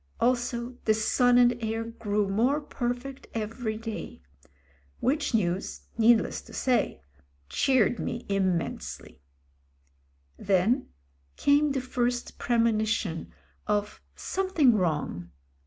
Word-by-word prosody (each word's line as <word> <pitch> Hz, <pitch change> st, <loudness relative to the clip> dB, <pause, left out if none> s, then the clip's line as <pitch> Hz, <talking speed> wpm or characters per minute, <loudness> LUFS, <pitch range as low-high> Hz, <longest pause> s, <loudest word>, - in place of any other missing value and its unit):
Also 245 Hz, 0 st, 0 dB
the 215 Hz, -, +4 dB
son 245 Hz, +3 st, +3 dB
and 245 Hz, 0 st, +5 dB
heir 225 Hz, +1 st, -1 dB
grew 210 Hz, -3 st, -1 dB
more 240 Hz, +9 st, +2 dB
perfect 255 Hz, -1 st, -4 dB
every 220 Hz, 0 st, -3 dB
day. 225 Hz, 0 st, -6 dB, 0.8 s
Which 290 Hz, -2 st, +1 dB
news, 185 Hz, -3 st, -1 dB
needless 230 Hz, 0 st, +3 dB
to -, -, -15 dB
say, 245 Hz, -, 0 dB, 0.5 s
cheered 245 Hz, -, +2 dB
me 235 Hz, -, -4 dB
immensely. 185 Hz, -, -2 dB, 1.2 s
Then 200 Hz, +7 st, +2 dB, 0.5 s
came 290 Hz, +1 st, +3 dB
the 265 Hz, -, -1 dB
first 245 Hz, -1 st, -2 dB
premonition 220 Hz, -6 st, 0 dB, 0.4 s
of 210 Hz, 0 st, -1 dB
something 370 Hz, -10 st, +2 dB
wrong. 150 Hz, -, -1 dB
230 Hz, 100 wpm, -28 LUFS, 210-250 Hz, 1.2 s, and